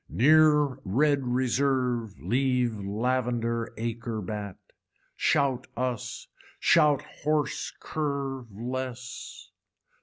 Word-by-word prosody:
Near 150 0 +5
red 140 +6 +2
reserve 125 -3 0
leave 125 -2 +1
lavender 115 +2 -1
acre 115 0 -3
bat. 105 -1 -5 0.6
Shout 130 -3 +1
us, 125 -3 -3 0.3
shout 150 -4 +4 0.2
horse 150 -1 0
curve 140 -4 -3
less. 125 +3 -6
125 Hz, 80 wpm, -28 LUFS, 115-140 Hz, 0.6 s, Near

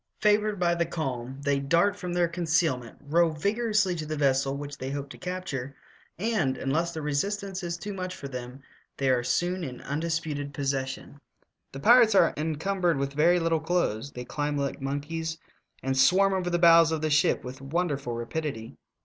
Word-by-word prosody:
Favored 210 -1 +2
by 175 -1 +3
the 170 -1 0
calm, 135 -5 -4
they 140 -1 +2
dart 170 +8 +2
from 180 -3 -5
their 175 0 +2
conceal 165 -3 +1
ment, 120 -2 -11
row 165 +4 +3
vigorously 205 +4 +1
to 155 - -4
the 155 0 -3
vessel 135 -1 +1
which 145 0 -6
they 130 - -4
hope 140 0 -4
to - - -10
capture, 180 -8 -5 0.4
and, 190 - 0
unless 160 +6 0
the 160 -2 -6
resistance 195 +6 -2
is 170 -1 -3
too 205 +4 -6
much 185 -1 -5
for 140 - -7
them, 125 0 -8 0.3
they 135 -1 +2
are 125 -1 +2
soon 175 +7 0
in 125 -5 -6
undisputed 150 -1 -3
possession. 135 0 -3 0.5
The 135 - -8
pirates 230 - +6
are 175 -3 +5
encumbered 165 +2 0
with 140 0 -2
very 170 +5 +4
little 165 -1 +1
clothes; 155 -7 -1
they 125 0 -6
climb 145 +2 -2
like 140 0 -2
monkeys, 160 +4 -3 0.5
and 135 0 0
swarm 195 +8 +4
over 185 -2 -1
the 175 - +1
bows 165 -1 +6
of 160 -1 -1
the 155 -1 0
ship 150 +2 +3
with 130 +1 -8
wonderful 140 -3 -2
rapidity. 120 -1 -4
155 Hz, 185 wpm, -27 LUFS, 140-175 Hz, 0.5 s, pirates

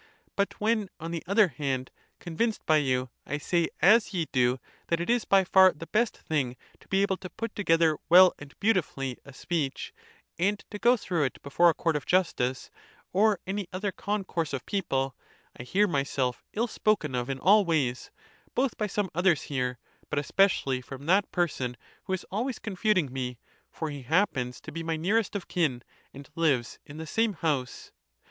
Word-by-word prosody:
But 200 0 -1
when, 215 -2 +1
on 165 +1 -5
the 170 -1 -3
other 200 0 +4
hand, 130 -2 -3 0.3
convinced 205 +6 -2
by. 155 - +4
you, 130 -3 0
I 145 - -3
say 170 +2 +1 0.2
as 210 +2 +5
ye 170 -3 0
do, 125 0 +2 0.3
that 170 - 0
it 175 +7 0
is 240 -1 +1
by 195 -1 +4
far 190 0 +6
the 165 - -9
best 220 +6 0
thing 135 -6 -2 0.2
to - - -22
be 195 +1 +2
able 195 -1 0
to 185 -1 -8
put 225 +5 -6
together 165 -5 +2
well 180 +2 +8
and 145 -1 -13
beautifully 155 - 0
a 140 - -11
speech, 145 0 -3 0.5
and 200 +4 +2
to 210 - -6
go 245 +3 +4
through 175 -8 -1
it 130 - -4
before 170 +5 +4
a 165 - +1
court 165 -2 0
of 150 - -3
justice, 130 -8 0 0.4
or 205 +1 +3
any 195 0 -3
other 195 +2 -2
concourse 190 -7 -3
of 135 - -4
people, 135 -9 -1 0.4
I - - -9
hear 200 +11 +2
myself 140 -5 -1
ill 225 +3 +1
spoken 215 - 0
of 125 +1 -2
in 135 - -2
all 200 +9 +5
ways, 145 -8 -1 0.5
both 260 -1 0
by 210 - 0
some 205 -2 -2
others 175 -2 +2
here, 125 -3 -2 0.3
but - - -2
especially 145 -4 +2
from 135 +2 -10
that 190 +5 +3
person, 135 -8 -1 0.3
who 190 - -2
is 190 - -3
always 240 +6 -2
confuting 190 - 0
me; 125 -2 -4 0.3
for 160 -2 -4
he 145 -1 -7
happens 130 -4 0
to 155 - -9
be 165 +2 -5
my 165 0 -2
nearest 205 +6 0
of 200 - -4
kin, 140 -9 0 0.3
and 140 0 -11
lives 145 -8 0
in 145 - -10
the 160 - -6
same 225 +6 +1
house. 145 -7 -2
165 Hz, 185 wpm, -28 LUFS, 140-200 Hz, 0.5 s, well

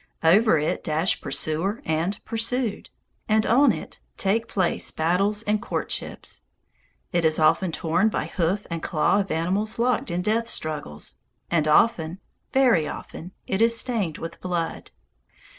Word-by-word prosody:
Over 195 +3 +5
it 150 +1 -1
dash 160 +4 0
pursuer 160 - -1
and 165 +6 -1
pursued; 230 0 -2 0.4
and 215 0 +3
on 270 +6 +5
it - - -7 0.2
take 215 +4 0
place 185 -4 0
battles 195 +6 0
and 210 -1 0
courtships. - - -4 0.7
It 170 -1 +1
is 160 -1 +2
often 165 +3 +3
torn 175 +6 +1
by - - -2
hoof 185 +3 -1
and 165 -1 -3
claw 165 +5 +2
of 195 -2 -2
animals 190 +7 -1
locked 240 -2 +1
in 175 +1 -2
death 225 +3 0
struggles, 145 - -5 0.3
and 160 -3 +2
often, 170 0 +3 0.3
very 240 - +4
often, 175 +4 -8
it 190 +2 -1
is 230 0 +4
stained 220 -11 -1
with 165 - -8
blood. 175 -2 -3
185 Hz, 140 wpm, -24 LUFS, 160-220 Hz, 0.7 s, Over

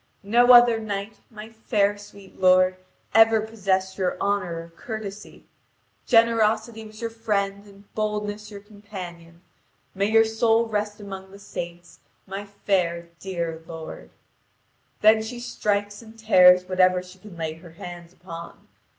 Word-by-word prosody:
No 240 +5 +5
other 240 -2 +7
knight, 210 0 -5
my 215 -1 -10
fair 210 -2 0
sweet 205 -1 -15
lord, 185 0 +5 0.4
ever 225 0 +6
possessed 190 -3 -2
your 180 -1 0
honour 200 -4 -1
or 165 0 -16
courtesy. 210 0 -8 0.6
Generosity 225 -1 +2
was 215 +1 -13
your 230 0 -3
friend 200 -3 -2
and 200 0 -19
boldness 210 -1 -3
your 200 -2 -10
companion. 185 -5 -11 0.5
May 195 +1 0
your 225 0 +5
soul 225 +1 +2
rest 210 -1 -3
among 195 -2 -8
the 200 - -13
saints, 175 -3 -8 0.3
my 195 +1 -6
fair 180 -4 -1
dear 170 -4 -4
lord." 160 -1 -9 0.9
Then 220 +1 +6
she 235 +2 -6
strikes 205 -3 -2
and 225 0 -15
tears 180 -4 +6
whatever 185 -1 +3
she 180 +1 -15
can 185 -3 -13
lay 160 -1 -3
her 165 0 -15
hands 175 0 -10
upon. 170 -2 -11
200 Hz, 140 wpm, -24 LUFS, 185-220 Hz, 0.9 s, other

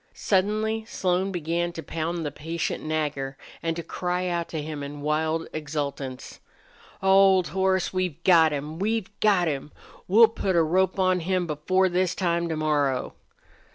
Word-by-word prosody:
Suddenly 215 +3 0
Slone 185 -3 0
began 170 0 -1
to 165 - -7
pound 165 +1 -3
the 145 - -2
patient 165 +3 -4
Nagger 145 -3 -2 0.2
and 165 0 -1
to 170 - -5
cry 180 +1 -2
out 170 -1 -1
to 160 - -4
him 150 -1 -5
in 145 +1 -7
wild 155 +2 0
exultance. 140 -4 -5 0.6
"Old 190 -1 +5
horse, 190 -1 +1
we've 185 -5 -2
got 165 -4 +6
him! 150 +3 -4
We've 215 0 -1
got 195 -5 +3
him! 145 -1 -3 0.4
We'll 225 +5 +7
put 195 -4 -1
a 170 - +5
rope 185 +4 +1
on 185 -1 +2
him 180 +1 0
before 175 +5 +1
this 180 0 0
time 170 -2 0
to 160 - -2
morrow!" 145 -4 0
170 Hz, 155 wpm, -25 LUFS, 155-185 Hz, 0.6 s, We'll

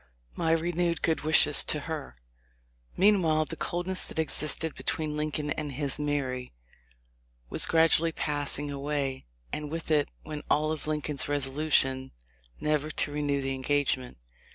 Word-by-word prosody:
My 165 - -1
renewed 170 +1 0
good 160 -1 +1
wishes 155 +2 +6
to - - 0
her." 60 -1 -6 0.8
Meanwhile 175 -6 +3
the 165 - -6
coldness 175 +4 -1
that - - -8
existed 160 0 +1
between 155 -2 -3
Lincoln 150 -1 -2
and 150 -2 -3
his 140 +1 -1
"Mary" 135 - -2 1.0
was - - +4
gradually 165 0 +4
passing 145 -1 -1
away, 140 - -3 0.3
and 150 -1 -3
with 165 +1 -5
it 150 -2 +2 0.2
went 150 -1 -7
all 155 +1 +2
of 155 -1 -3
Lincoln's 150 -2 0
resolution 135 -2 +1 0.5
never 150 0 0
to 150 - +1
renew 145 -1 -1
the 135 0 -2
engagement. 130 - -1
150 Hz, 135 wpm, -28 LUFS, 140-160 Hz, 1.0 s, wishes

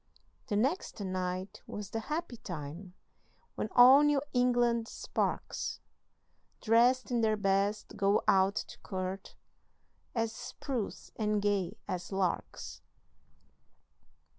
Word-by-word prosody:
The 210 - -1
next 265 - 0
night 185 -1 -3
was 205 -1 -6
the 225 - -2
happy 300 +1 -4
time 175 +1 -7 0.6
When 215 - -3
all 255 +3 +9
New 295 -2 +3
England 240 -2 +2
sparks, - - -2 0.8
Drest 245 +3 +3
in 240 -1 +2
their 215 -1 +2
best, 200 +1 0
go 200 0 +3
out 195 +1 +4
to - - -5
court, 190 0 -5 0.8
As 225 -1 0
spruce 240 -2 -5
and 210 -1 +1
gay 200 -1 0
as 180 +1 -4
larks. 190 -2 -2
210 Hz, 110 wpm, -31 LUFS, 190-240 Hz, 0.8 s, all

